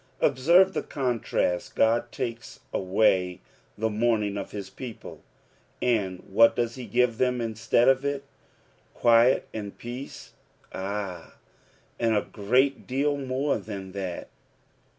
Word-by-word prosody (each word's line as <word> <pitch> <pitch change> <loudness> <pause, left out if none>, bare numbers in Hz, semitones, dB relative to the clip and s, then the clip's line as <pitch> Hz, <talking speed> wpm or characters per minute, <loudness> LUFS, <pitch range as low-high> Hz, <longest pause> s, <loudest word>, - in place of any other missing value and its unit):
Observe 175 +9 +4
the - - -1
contrast, 120 -9 -1
God 115 +1 +2
takes 115 -1 -5
away 95 -2 +2 0.4
the 110 +1 0
mourning 110 -2 +1
of 100 - -4
his 100 -2 -6
people; 115 +4 -9 0.6
and 100 -7 0
nhat 115 +4 +4
does 120 -1 -1
he 125 -2 -8
give 120 +2 +1
them 125 -1 +1
instead 115 +1 +1
of 135 0 +4
it 140 -1 -2
I - - -34
Quiet 120 +2 +5
and 105 -2 -6
peace) 125 +3 -8 0.4
Ay, 95 -3 -5 0.7
and 115 -1 +2
a - - +1
great 125 +7 +1
deal 140 +3 +1
more 135 +1 -1
tlian 95 -2 -7
that. 95 -3 -5
115 Hz, 130 wpm, -26 LUFS, 100-130 Hz, 0.7 s, Quiet